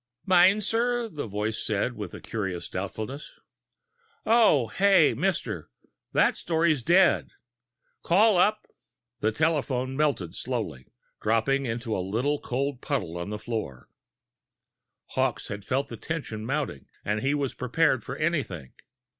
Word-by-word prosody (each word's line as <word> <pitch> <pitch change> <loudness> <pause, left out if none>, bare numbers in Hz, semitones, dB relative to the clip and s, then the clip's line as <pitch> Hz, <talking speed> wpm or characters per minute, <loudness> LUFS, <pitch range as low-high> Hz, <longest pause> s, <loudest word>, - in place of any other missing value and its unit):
"Meinzer," 215 +6 +3
the 150 - -5
voice 105 +2 -2
said, 105 +4 -1
with 105 -4 -6
a - - -8
curious 95 -6 -4
doubtfulness. 110 +9 -5 0.9
"Oh, 215 - +4
yeah. 195 -8 +6
Mister, 170 - -2 0.4
that - - +3
story's 160 -4 +1
dead! 175 +7 +4 0.7
Call 205 +5 +4
up...." 210 +4 +3 0.5
The 110 - +1
telephone 135 -2 0
melted 140 - 0
slowly, 65 0 -4 0.3
dropping 130 +5 +1
into 115 -1 -2
a - - -1
little 120 +10 -1
cold 135 +1 -2
puddle 130 - -2
on 85 +2 -4
the 105 - -3
floor! 105 - -5 1.2
Hawkes - - -1
had 105 -1 -5
felt 135 +6 -1
the - - -7
tension 115 -9 -5
mounting, 135 - -3 0.2
and 105 +1 0
he 135 +2 +1
was 140 -3 -1
prepared 130 +1 +1
for 130 - -5
anything. 135 - -2
135 Hz, 130 wpm, -27 LUFS, 110-165 Hz, 1.2 s, yeah